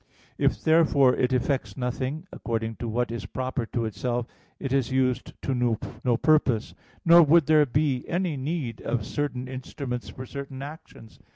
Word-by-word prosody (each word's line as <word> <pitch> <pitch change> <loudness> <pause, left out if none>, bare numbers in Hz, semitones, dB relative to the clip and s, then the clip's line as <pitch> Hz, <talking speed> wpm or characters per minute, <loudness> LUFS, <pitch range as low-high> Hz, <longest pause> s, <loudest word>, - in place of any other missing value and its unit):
If - - +2
therefore 150 -5 +5
it 125 0 +1
effects 130 +2 0
nothing, 130 +5 -3
according 115 -1 -3
to 120 - -4
what 120 +2 -1
is 115 -3 -5
proper 130 0 -3
to 115 0 -2
itself, 120 +3 -2 0.3
it 135 -2 -3
is 135 -2 +1
used 130 -1 0
to 135 - 0 0.5
no 120 -2 +2
purpose; 135 -7 +2 0.3
nor 170 +1 +9
would 160 0 +5
there 155 -1 +5
be 135 -1 +1
any 175 -2 -1
need 135 -4 -3
of 115 -3 -2
certain 130 -3 -3
instruments 130 -1 -5
for 130 - -8
certain 135 0 -7
actions. 145 -6 -11
130 Hz, 160 wpm, -26 LUFS, 120-145 Hz, 0.5 s, nor